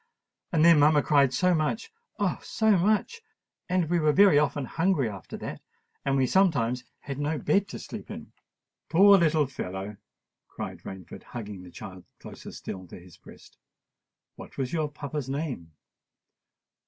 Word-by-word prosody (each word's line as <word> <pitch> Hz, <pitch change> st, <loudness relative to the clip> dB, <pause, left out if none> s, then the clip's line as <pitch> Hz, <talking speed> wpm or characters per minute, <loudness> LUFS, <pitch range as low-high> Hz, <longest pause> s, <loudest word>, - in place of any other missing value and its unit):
And 165 Hz, -3 st, +3 dB
then 170 Hz, -3 st, +7 dB
mamma 145 Hz, 0 st, +5 dB
cried 140 Hz, -3 st, +4 dB
so 180 Hz, +8 st, +2 dB
much—oh! 445 Hz, -, -3 dB
so 220 Hz, -1 st, +1 dB
much; 215 Hz, -, +1 dB, 0.5 s
and 180 Hz, -2 st, +1 dB
we 175 Hz, +2 st, +1 dB
were 155 Hz, -1 st, +3 dB
very 190 Hz, -3 st, +6 dB
often 145 Hz, -2 st, 0 dB
hungry 165 Hz, -2 st, +1 dB
after 100 Hz, -5 st, -8 dB
that—and 135 Hz, 0 st, -6 dB
we 130 Hz, -, +3 dB
sometimes 125 Hz, -8 st, +2 dB, 0.2 s
had 140 Hz, -1 st, -6 dB
no 150 Hz, +2 st, -1 dB
bed 195 Hz, +8 st, +1 dB
to -, -, -7 dB
sleep -, -, -9 dB
in." -, -, -9 dB, 0.6 s
"Poor 200 Hz, +3 st, +7 dB
little 155 Hz, -3 st, +3 dB
fellow!" 100 Hz, -5 st, -6 dB, 0.5 s
cried -, -, -7 dB
Rainford, 95 Hz, -3 st, -9 dB
hugging 105 Hz, -5 st, -8 dB
the 90 Hz, -, -12 dB
child 95 Hz, -1 st, -10 dB, 0.2 s
closer -, -, -10 dB
still 95 Hz, -1 st, -8 dB
to 85 Hz, -, -11 dB
his 90 Hz, -1 st, -16 dB
breast. -, -, -17 dB, 0.8 s
"What -, -, -12 dB
was 130 Hz, 0 st, -3 dB
your 155 Hz, -3 st, 0 dB
papa's 145 Hz, -2 st, -5 dB
name?" 135 Hz, -, -4 dB
150 Hz, 150 wpm, -27 LUFS, 120-175 Hz, 0.8 s, then